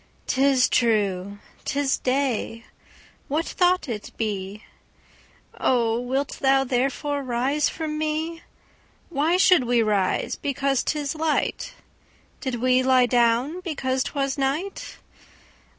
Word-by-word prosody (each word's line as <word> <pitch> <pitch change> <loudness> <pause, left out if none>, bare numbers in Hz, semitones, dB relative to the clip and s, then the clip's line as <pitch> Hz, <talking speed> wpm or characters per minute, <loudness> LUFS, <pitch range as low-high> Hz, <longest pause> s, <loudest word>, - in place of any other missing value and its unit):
'Tis 265 -1 +3
true, 200 -4 +1 0.3
'tis 280 -1 0
day: 255 -4 -1 0.6
what 310 +4 -2
though 360 0 +5
it 225 -7 -5
be?O, 220 +3 -4
wilt 265 +3 -2
thou 270 0 +4
therefore 270 +3 -1
rise 265 +3 0
from 310 -1 -4
me? 315 +2 -2 0.7
Why 325 +2 +1
should 360 -7 +5
we 240 -1 +3
rise 205 -3 0
because 275 -1 0
'tis 295 -2 -2
light? 320 +9 -1 0.6
Did 260 -3 -3
we 255 +2 +2
lie 255 -1 +4
down 245 +6 +2
because 270 -7 -2
'twas 275 -1 -2
night? 295 +9 -3
265 Hz, 105 wpm, -24 LUFS, 240-295 Hz, 0.7 s, though